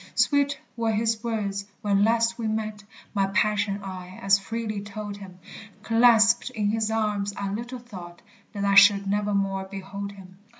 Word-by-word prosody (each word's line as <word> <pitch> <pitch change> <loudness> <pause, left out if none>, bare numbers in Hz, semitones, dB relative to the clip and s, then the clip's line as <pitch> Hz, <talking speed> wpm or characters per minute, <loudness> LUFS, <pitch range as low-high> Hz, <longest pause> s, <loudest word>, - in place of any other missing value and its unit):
Sweet 285 -1 +2 0.2
were 230 -1 0
his 220 +1 0
words 205 -4 -2 0.2
when 200 -1 +2
last 230 +1 +2
we 225 - -2
met; 215 -1 -3 0.3
My 195 -2 +1
passion 205 0 0
I 185 -1 -8
as 195 0 +4
freely 215 0 -4
told 205 0 -7
him! 190 -3 -11 0.5
Clasped 230 +1 +4
in 210 -5 -1
his 220 0 0
arms, 210 -2 -1
I 200 -1 -3
little 240 +4 -5
thought 185 -8 -11 0.3
That 200 -1 -2
I 200 - +2
should 200 0 +7
nevermore 195 -1 -1
behold 200 +1 -6
him! 185 -1 -15
205 Hz, 160 wpm, -25 LUFS, 195-225 Hz, 0.5 s, should